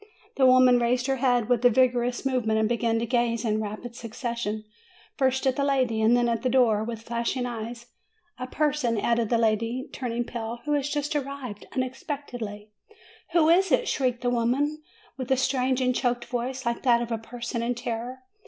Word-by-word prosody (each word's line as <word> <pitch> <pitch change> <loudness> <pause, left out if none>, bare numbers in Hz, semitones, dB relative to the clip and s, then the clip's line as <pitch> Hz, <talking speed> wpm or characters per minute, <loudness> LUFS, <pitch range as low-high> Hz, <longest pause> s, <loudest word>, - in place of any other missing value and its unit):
The 265 -1 +5
woman 255 -1 +6
raised 245 +1 +1
her 270 0 0
head 245 -3 +2
with 245 -1 +1
a 245 - +7
vigorous 245 +1 +1
move 255 -4 0
ment, 220 0 +2
and 220 - +2
began 235 0 0
to 230 - -1
gaze 235 -1 0
in 215 -1 +1
rapid 215 +3 -6
succession, 230 -2 -4 0.5
first 265 -1 +1
at 260 -1 +2
the 280 - +1
lady 255 -5 +1
and 230 +3 +5
then 240 0 +2
at 230 -1 0
the 255 - 0
door, 235 -4 +3
with 225 0 -6
flashing 235 +2 -2
eyes. 235 0 -6 0.5
"A 255 - -4
person," 285 -5 0
added 235 0 +1
the 235 - +3
lady, 230 +3 0
turning 240 -2 -2
pale, 235 -1 -5
"who 295 - 0
has 290 -1 0
just 295 +1 -2
arrived 275 -6 -5
unexpectedly." 250 -5 -5 0.6
"Who 325 -2 +4
is 375 +3 +4
it?" - - +3
shrieked 250 -7 0
the 245 -1 0
woman, 265 +6 0 0.4
with 255 -1 -5
a 265 - +4
strange 260 0 +1
and 255 0 +2
choked 245 -1 -1
voice, 250 +2 -4
like 235 0 -1
that 240 -2 +3
of 235 - -7
a 225 - -1
person 235 +1 -5
in 240 +1 -1
terror. 245 +2 -5
245 Hz, 195 wpm, -26 LUFS, 230-260 Hz, 0.6 s, a